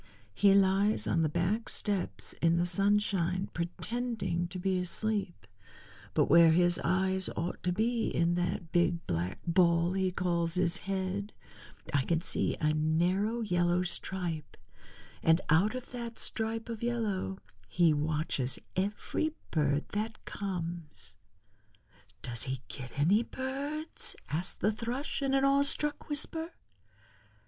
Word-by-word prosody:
He 195 - +5
lies 200 +2 +3
on 165 - +1
the 155 - +2
back 175 +8 0
steps 200 -4 +1
in 170 0 +4
the 175 - +2
sunshine 195 -1 +1
pretending 185 0 -2
to 180 +2 -7
be 185 0 0
asleep, 195 - -2 0.7
but - - +4
where 170 +1 +7
his 175 +1 +3
eyes 190 +1 +1
ought 170 +2 -3
to 180 - 0
be 225 +4 0
in 170 +1 +1
that 175 -1 -2
big 175 -1 +1
black 85 +3 -2
ball 170 0 +3
he 190 -1 +1
calls 170 -2 0
his 180 0 +1
head 195 +2 -2 0.6
I 145 - +4
can 165 +2 +1
see 170 - -1
a 155 0 +2
narrow 175 +9 +1
yellow 175 -3 +1
stripe, 175 -4 -4 0.6
and 165 +1 +4
out 195 +9 +4
of 255 - -7
that 235 -2 -6
stripe 225 0 0
of 230 -2 -6
yellow 215 - -1 0.3
he 170 - +3
watches 150 -4 -1 0.2
every 210 +11 -1 0.2
bird 145 -2 +1
that 215 +2 -4
comes." 170 - -5 1.1
"Does 120 -3 -2
he 130 -1 -3
get 130 0 -8
any 180 +10 +4
birds?" 280 +6 -5
asked 170 +5 -2
the 210 - +3
Thrush 240 +7 -3
in 270 -1 +1
an 270 0 +3
awe 275 0 +4
struck 295 +2 +2
whisper. 320 +3 -3
185 Hz, 135 wpm, -31 LUFS, 170-215 Hz, 1.1 s, where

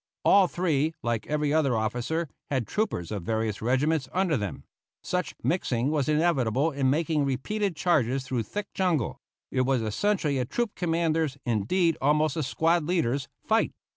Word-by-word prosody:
All 195 -2 +6
three, 160 -3 0
like 115 -2 -1
every 150 -1 0
other 140 -7 +2
officer, 125 +10 -1 0.2
had 130 -5 0
troopers 155 - -2
of 105 -3 -3
various 110 +2 -2
regiments 130 +4 +1
under 185 -4 +1
them; 105 -7 -4 0.4
such 180 -2 -2
mixing 135 -6 0
was 150 -2 0
inevitable 150 -3 +2
in 135 -2 +1
making 155 +1 +1
repeated 175 +9 -1
charges 135 -6 +1
through 130 -2 -2
thick 200 - -6
jungle; 175 - 0 0.3
it 130 - +1
was 130 -2 +1
essentially 150 - 0
a 125 - 0
troop 225 - -2
commanders', 165 -4 0
indeed, 130 - +1
almost 150 +1 +2
a 160 - -1
squad 165 +4 +1
leaders', 140 -6 0 0.2
fight. - - +1
150 Hz, 155 wpm, -27 LUFS, 125-170 Hz, 0.4 s, All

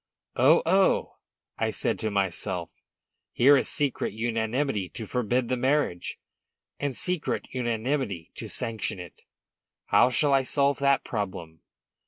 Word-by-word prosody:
"Oh, 145 +7 +5
oh!" 190 +3 +2 0.4
I - - +1
said - - -2
to 110 - -1
myself, 95 -3 -2 0.6
"here 140 +4 +6
is 135 - +1
secret 145 -8 -1
unanimity 115 -1 -1
to 110 - -7
forbid 125 +2 0
the 130 +1 0
marriage, 130 -8 0 0.6
and 140 -3 -2
secret 180 -3 -1
unanimity 120 - -2
to - - -7
sanction 110 -4 -3
it! 90 -3 -11 0.6
How - - +4
shall 140 +2 +2
I 135 - +5
solve 140 +1 +1
that 140 -1 +3
problem?" 95 -7 -5
120 Hz, 130 wpm, -27 LUFS, 105-140 Hz, 0.6 s, here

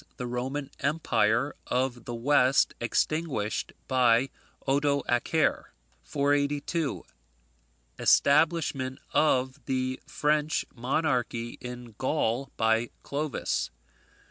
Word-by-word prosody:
The 125 - -4
Roman 130 +4 -3
Empire 140 -3 +1
of 125 -1 -1
the 120 - -4
West 130 +2 +3
extinguished 125 -3 -1 0.2
by 125 0 +3 0.4
Odoacer. 140 +1 +1 0.4
482. 145 +2 0 1.0
Establishment 140 -3 +3 0.2
of 130 -2 +2
the 130 0 -1
French 150 +1 +1
monarchy 125 -2 -1
in 125 -2 -8
Gaul 130 -1 0
by 115 +1 +2
Clovis. 140 - -2
130 Hz, 80 wpm, -28 LUFS, 120-145 Hz, 1.0 s, West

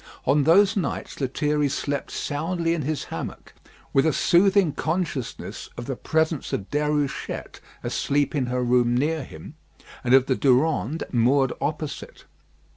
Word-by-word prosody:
On 140 +1 +3
those 200 +6 +5
nights 170 -5 -3
Lethierry 145 +2 0
slept 140 0 -3
soundly 165 +3 -1
in 170 - -1
his 150 0 -2
hammock, - - -7 0.4
with 135 +3 +4
a 160 - +2
soothing 190 -1 +4
consciousness 160 -5 -3
of 120 - -5
the 135 - -3
presence 160 +2 -1
of 95 - -3
Déruchette 150 -1 -2 0.2
asleep 145 0 0
in 135 -4 0
her 125 0 -1
room 120 0 +3
near 155 +3 0
him, 80 -10 -11 0.5
and 125 +1 +5
of 135 -1 +5
the 130 - +1
Durande 135 - +2
moored 130 +2 +3
opposite. 150 -1 -4
145 Hz, 140 wpm, -24 LUFS, 130-160 Hz, 0.5 s, those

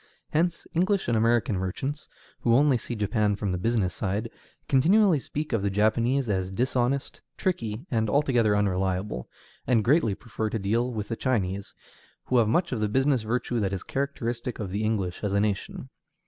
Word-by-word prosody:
Hence 170 +2 0
English 185 +3 +1
and 120 - +2
American 115 -2 +2
merchants, 130 +11 -4 0.3
who 115 -1 +3
only 140 +1 +5
see 120 - -5
Japan 105 0 +1
from 100 -1 -2
the 90 - -2
business 105 -3 0
side, 105 +3 -2 0.4
continually 175 +5 +4
speak 150 +1 -4
of 115 - +1
the 100 - 0
Japanese 115 +6 +2
as 95 -3 -1
dishonest, 125 +5 -1 0.2
tricky, 120 - -2
and 110 -3 +1
altogether 120 -6 +3
unreliable, 95 -6 -1 0.4
and 115 -4 +3
greatly 120 - +3
prefer 110 -1 -4
to 115 - -2
deal 115 +5 0
with 105 -3 -4
the 115 - -1
Chinese, 100 -6 -2 0.5
who 125 - +2
have 115 - +3
much 170 +10 +1
of 125 - -1
the 105 -1 0
business 135 +2 +2
virtue 120 +2 -1
that 100 -2 -1
is 95 - -4
characteristic 125 -3 -3
of 100 -4 -5
the 105 +3 -2
English 100 -5 -1
as 100 -1 -1
a 100 - +3
nation. 105 -2 -2
115 Hz, 175 wpm, -26 LUFS, 100-130 Hz, 0.5 s, only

